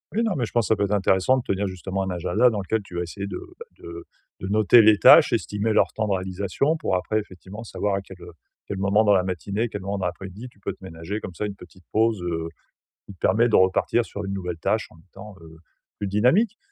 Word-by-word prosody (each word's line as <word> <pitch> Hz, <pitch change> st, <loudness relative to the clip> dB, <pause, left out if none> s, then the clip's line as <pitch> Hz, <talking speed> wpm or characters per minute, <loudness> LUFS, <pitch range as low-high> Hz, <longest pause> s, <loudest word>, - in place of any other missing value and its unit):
Oui 230 Hz, -, +2 dB
non 220 Hz, -4 st, 0 dB
mais 120 Hz, -, 0 dB
je -, -, -10 dB
pense 120 Hz, -2 st, +1 dB
ça 110 Hz, -, +3 dB
peut 100 Hz, -, +1 dB
être 100 Hz, -, -2 dB
intéressant 95 Hz, +5 st, +2 dB
de 125 Hz, -, -3 dB
tenir 100 Hz, -1 st, -1 dB
justement 95 Hz, +1 st, -4 dB
un 95 Hz, -, -3 dB
agenda 105 Hz, +7 st, +2 dB
dans 105 Hz, -3 st, -3 dB
lequel 110 Hz, +4 st, -1 dB
tu 95 Hz, -3 st, -13 dB
vas 85 Hz, -, -1 dB
essayer 100 Hz, +3 st, -5 dB
de -, -, -5 dB, 0.2 s
bah -, -, -9 dB
de 85 Hz, 0 st, -10 dB, 0.3 s
de 95 Hz, -, -5 dB
noter 110 Hz, +3 st, +5 dB
les 105 Hz, -1 st, +6 dB
tâches, -, -, +7 dB
estimer 105 Hz, +2 st, -1 dB
leur -, -, +3 dB
temps 110 Hz, -1 st, -2 dB
de 100 Hz, -, +1 dB
réalisation 95 Hz, -, -1 dB
pour 95 Hz, -, -1 dB
après 105 Hz, +4 st, 0 dB
effectivement 100 Hz, +1 st, -10 dB
savoir 105 Hz, -2 st, -2 dB
à 100 Hz, -, -2 dB
quel, 95 Hz, -2 st, -14 dB
heu, 85 Hz, -, -10 dB, 0.4 s
quel 100 Hz, -, -4 dB
moment 100 Hz, +3 st, +2 dB
dans 105 Hz, -1 st, +4 dB
la 90 Hz, -, +2 dB
matinée, 95 Hz, +4 st, -3 dB
à -, -, 0 dB
quel 105 Hz, -3 st, -6 dB
moment 100 Hz, +1 st, -3 dB
dans 95 Hz, -, -3 dB
l'après-midi, 95 Hz, +6 st, -6 dB
tu 100 Hz, -, -27 dB
peux -, -, -4 dB
te -, -, -24 dB
ménager 85 Hz, +4 st, -6 dB
comme 90 Hz, -, -7 dB
ça 105 Hz, -, -4 dB
une 100 Hz, -, -7 dB
petite 90 Hz, -1 st, -16 dB
pause, 110 Hz, -3 st, +1 dB
heu, 80 Hz, -1 st, -3 dB, 0.6 s
qui 100 Hz, -, -11 dB
te -, -, -32 dB
permet 115 Hz, +5 st, +3 dB
de -, -, +2 dB
repartir 95 Hz, +5 st, +3 dB
sur 100 Hz, -1 st, -7 dB
une 95 Hz, -, -4 dB
nouvelle 90 Hz, -4 st, -5 dB
tâche 110 Hz, +5 st, 0 dB
en -, -, -18 dB
étant, 100 Hz, +2 st, -11 dB
heu, 80 Hz, -1 st, -14 dB, 0.4 s
plus 100 Hz, -, -4 dB
dynamique, 130 Hz, -, +2 dB
100 Hz, 260 wpm, -24 LUFS, 95-110 Hz, 0.6 s, tâches